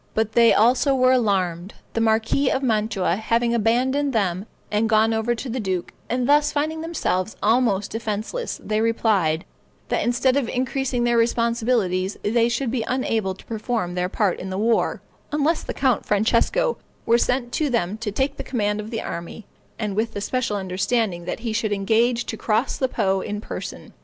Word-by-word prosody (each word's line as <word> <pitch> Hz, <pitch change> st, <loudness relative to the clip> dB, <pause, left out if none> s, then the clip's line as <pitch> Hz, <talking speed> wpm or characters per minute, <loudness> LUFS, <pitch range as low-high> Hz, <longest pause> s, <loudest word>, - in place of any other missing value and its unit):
But 220 Hz, 0 st, +1 dB
they 235 Hz, 0 st, +5 dB
also 255 Hz, +5 st, +4 dB
were 255 Hz, 0 st, +4 dB
alarmed, 190 Hz, -7 st, 0 dB, 0.2 s
the 230 Hz, -, 0 dB
marquis 225 Hz, +5 st, +2 dB
of 270 Hz, -, 0 dB
Mantua 215 Hz, -6 st, +1 dB
having 235 Hz, +2 st, +1 dB
abandoned 255 Hz, +5 st, +1 dB
them 195 Hz, -2 st, 0 dB, 0.2 s
and 215 Hz, +1 st, +1 dB
gone 220 Hz, 0 st, +4 dB
over 225 Hz, +2 st, 0 dB
to 250 Hz, -, -6 dB
the 250 Hz, +1 st, -3 dB
duke; 190 Hz, -5 st, -2 dB, 0.2 s
and 245 Hz, +1 st, 0 dB
thus, 295 Hz, +1 st, +4 dB
finding 310 Hz, +2 st, -1 dB
themselves 220 Hz, -, -2 dB
almost 215 Hz, -3 st, +2 dB
defenseless, 225 Hz, -, -3 dB
they 215 Hz, 0 st, 0 dB
replied, 205 Hz, -8 st, +1 dB, 0.4 s
"that -, -, +1 dB
instead 250 Hz, +2 st, +2 dB
of 265 Hz, -5 st, 0 dB
increasing 255 Hz, -1 st, -1 dB
their 240 Hz, 0 st, +2 dB
responsibilities, 230 Hz, -5 st, +1 dB
they 230 Hz, +2 st, +2 dB
should 235 Hz, +1 st, -1 dB
be 240 Hz, -3 st, -1 dB
unable 225 Hz, -7 st, -1 dB
to -, -, -16 dB
perform 220 Hz, -4 st, -2 dB
their 180 Hz, 0 st, -1 dB
part 195 Hz, -2 st, 0 dB
in 190 Hz, -, -6 dB
the 190 Hz, -, -3 dB
war, 225 Hz, +3 st, +1 dB, 0.3 s
unless 305 Hz, +2 st, +1 dB
the -, -, -5 dB
Count 260 Hz, -5 st, +1 dB
Francesco 470 Hz, -, +1 dB, 0.3 s
were 235 Hz, +1 st, +4 dB
sent 245 Hz, 0 st, 0 dB
to 300 Hz, +2 st, 0 dB
them 210 Hz, -6 st, 0 dB
to 220 Hz, -2 st, -3 dB
take 275 Hz, +6 st, -1 dB
the -, -, -4 dB
command 210 Hz, -4 st, -1 dB
of 210 Hz, +1 st, -6 dB
the 225 Hz, -1 st, -3 dB
army, 170 Hz, +5 st, -6 dB, 0.3 s
and 210 Hz, -3 st, -3 dB
with 225 Hz, +2 st, -1 dB
the 205 Hz, -, -3 dB
special 235 Hz, -2 st, -1 dB
understanding 190 Hz, 0 st, -1 dB
that 180 Hz, -, -4 dB
he 230 Hz, -2 st, -2 dB
should 215 Hz, -1 st, -1 dB
engage 230 Hz, +4 st, +1 dB
to -, -, -4 dB
cross 220 Hz, +3 st, 0 dB
the 260 Hz, -, 0 dB
Po 190 Hz, -4 st, 0 dB
in 210 Hz, +1 st, -4 dB
person. -, -, -7 dB
225 Hz, 180 wpm, -23 LUFS, 205-250 Hz, 0.4 s, they